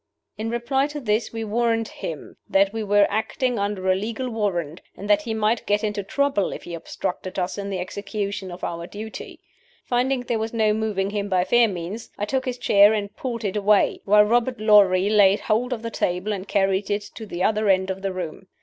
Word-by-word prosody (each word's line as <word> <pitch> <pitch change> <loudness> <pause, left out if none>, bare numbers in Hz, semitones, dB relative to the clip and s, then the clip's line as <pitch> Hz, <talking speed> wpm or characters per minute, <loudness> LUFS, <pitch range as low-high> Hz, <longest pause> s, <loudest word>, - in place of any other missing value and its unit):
In 220 +1 -4
reply 250 +4 0
to 295 0 -6
this 220 -3 0
we 225 0 -4
warned 225 +1 0
him - - -7
that 195 +1 +3
we 225 -1 -2
were 205 0 +4
acting 230 +3 -1
under 200 -2 -2
a 185 - +5
legal 225 +6 -3
warrant, 175 -8 -2 0.2
and 200 - -7
that 205 0 +4
he 225 +1 -3
might 220 +1 0
get 205 +1 +1
into 210 -1 -1
trouble 275 0 0
if - - -7
he 175 - -8
obstructed 180 +2 -5
us 180 -1 -1
in 200 -1 -5
the 195 - -2
execution 200 +1 -4
of 175 +1 -9
our 170 0 -4
duty. 215 +3 -8 0.5
Finding 250 +1 +1
there 235 -2 -2
was 225 +1 -3
no 215 -2 +3
moving 210 -3 -1
him 205 -1 -2
by 185 -2 +2
fair 235 +5 +4
means, 190 +3 -6
I 205 - -1
took 260 +4 -1
his 250 -1 -3
chair 205 -3 +5
and 200 -1 -4
pulled 235 -3 -4
it 195 - -2
away, 210 0 +3
while 210 +1 +6
Robert 240 +2 +1
Lorrie 200 -3 +5
laid 205 -1 +5
hold 235 +4 0
of 230 -2 -3
the 230 - -4
table 180 +3 -1
and 195 0 -6
carried 195 0 +1
it 205 0 0
to 220 - -8
the 175 -1 -3
other 215 -1 +2
end 190 0 +3
of 190 0 -6
the 195 0 -2
room. 185 0 -6
210 Hz, 215 wpm, -23 LUFS, 195-225 Hz, 0.5 s, while